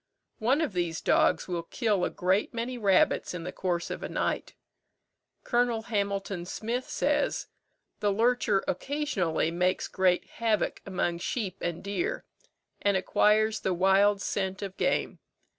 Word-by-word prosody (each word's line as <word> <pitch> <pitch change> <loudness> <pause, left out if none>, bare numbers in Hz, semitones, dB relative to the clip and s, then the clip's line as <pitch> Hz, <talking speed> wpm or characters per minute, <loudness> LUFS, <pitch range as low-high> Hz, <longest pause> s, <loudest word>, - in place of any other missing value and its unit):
One 255 +7 +2
of 300 -10 -1
these 175 -2 -1
dogs - - +2
will 175 -2 -2
kill 205 +2 0
a - - +1
great 190 +5 0
many 240 +2 -2
rabbits 195 -5 +2
in 170 - -5
the 180 - -4
course 175 -2 -2
of - - -5
a - - -4
night. - - -2 0.9
Col. 240 -2 +1
Hamilton 200 -4 -2
Smyth 235 +6 -3
says, - - 0 0.5
"The 205 - +2
lurcher 225 -2 +2
occasionally 220 - -1
makes 180 +2 0
great 185 -2 +2
havoc 225 -3 -1
among 175 -3 -1
sheep 195 0 -3
and 170 -1 -3
deer, 205 - -2 0.6
and 200 -1 +3
acquires 215 +3 +3
the 185 - -1
wild 195 +2 +4
scent 190 -1 -2
of 195 -1 -5
game. - - 0
200 Hz, 140 wpm, -28 LUFS, 180-225 Hz, 0.9 s, wild